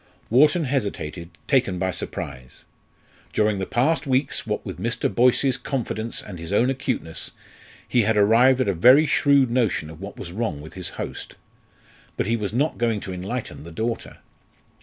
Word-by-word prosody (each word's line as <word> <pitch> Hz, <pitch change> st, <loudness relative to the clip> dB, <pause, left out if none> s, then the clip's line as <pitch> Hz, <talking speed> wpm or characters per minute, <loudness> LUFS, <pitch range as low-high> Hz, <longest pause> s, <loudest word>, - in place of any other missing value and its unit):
Wharton 150 Hz, +7 st, +5 dB
hesitated, 100 Hz, -, -3 dB, 0.2 s
taken 120 Hz, -10 st, +2 dB
by 95 Hz, +1 st, 0 dB
surprise. 65 Hz, -6 st, -6 dB, 0.7 s
During 105 Hz, -2 st, +1 dB
the 95 Hz, -, -3 dB
past 150 Hz, +5 st, +1 dB
weeks, 135 Hz, +1 st, 0 dB
what -, -, -2 dB
with -, -, -6 dB
Mr. -, -, -1 dB
Boyce's 125 Hz, +2 st, +3 dB
confidence 115 Hz, -4 st, -3 dB
and 90 Hz, -4 st, -9 dB
his 85 Hz, +2 st, -7 dB
own 120 Hz, +6 st, +3 dB
acuteness, 125 Hz, -11 st, -3 dB, 0.6 s
he 125 Hz, -, +3 dB
had 110 Hz, 0 st, +1 dB
arrived 120 Hz, +6 st, +5 dB
at 130 Hz, -, +1 dB
a 100 Hz, -, +2 dB
very 125 Hz, -, +6 dB
shrewd 140 Hz, -3 st, +3 dB
notion 110 Hz, -11 st, 0 dB
of 80 Hz, +2 st, -13 dB
what 100 Hz, +1 st, -8 dB
was 85 Hz, -, -7 dB
wrong 105 Hz, -6 st, -2 dB
with 80 Hz, +2 st, -11 dB
his 90 Hz, -2 st, -5 dB
host. -, -, -7 dB, 0.8 s
But -, -, 0 dB
he 115 Hz, +3 st, +1 dB
was 105 Hz, -4 st, -3 dB
not 140 Hz, +8 st, 0 dB
going 115 Hz, -3 st, +1 dB
to 95 Hz, -, -6 dB
enlighten 100 Hz, +2 st, -5 dB
the 85 Hz, -, -10 dB
daughter. 115 Hz, +7 st, -4 dB
115 Hz, 170 wpm, -23 LUFS, 95-130 Hz, 0.8 s, very